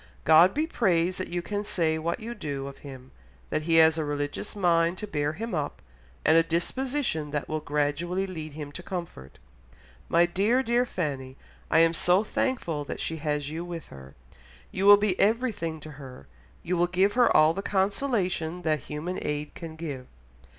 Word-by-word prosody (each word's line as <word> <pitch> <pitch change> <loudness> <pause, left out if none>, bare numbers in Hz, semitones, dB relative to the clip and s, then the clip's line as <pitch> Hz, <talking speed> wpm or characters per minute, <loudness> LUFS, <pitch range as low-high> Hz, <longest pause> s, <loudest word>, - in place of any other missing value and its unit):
God 160 - +6
be 305 +2 +1
praised 185 - +1
that 185 - -3
you 175 0 -3
can 205 +2 -3
say 165 -6 0
what 170 +5 -2
you 230 +1 -6
do 145 -10 -5
of 140 0 -9
him, 130 -2 -11 0.4
that - - 0
he 165 +1 +1
has 160 0 +6
a - - 0
religious 145 +7 -3
mind 170 -2 +2
to - - -4
bear 150 -6 -1
him 225 +5 -5
up 150 -4 -3 0.5
and 160 - +5
a 165 - +7
disposition 170 - -1
that 145 0 -3
will 155 0 -2
gradually 150 +6 -1
lead 160 -5 -7
him 145 -1 -7
to 180 - -7
comfort. 170 - -7 0.7
My 170 +1 +5
dear, 205 +9 +1
dear 240 +1 +1
Fanny, 135 - -4 0.3
I 160 - +5
am 165 0 +4
so 180 +4 +3
thankful 190 - -1
that - - -6
she 160 - -2
has 150 -1 -2
you 165 +2 -4
with 170 -2 -7
her! 65 0 -12 0.6
You 195 +2 0
will 205 0 +10
be 205 -3 0
everything 210 -8 0
to 155 - -9
her; 135 - -11 0.4
you 180 +1 -1
will 175 +1 +3
give 190 +3 +2
her 245 -1 +4
all 155 +1 +5
the 195 - -4
consolation 190 -4 -1
that 155 -2 +1
human 155 +6 -5
aid 150 0 -3
can 165 -2 -8
give. 145 -6 -6
165 Hz, 185 wpm, -27 LUFS, 150-195 Hz, 0.7 s, will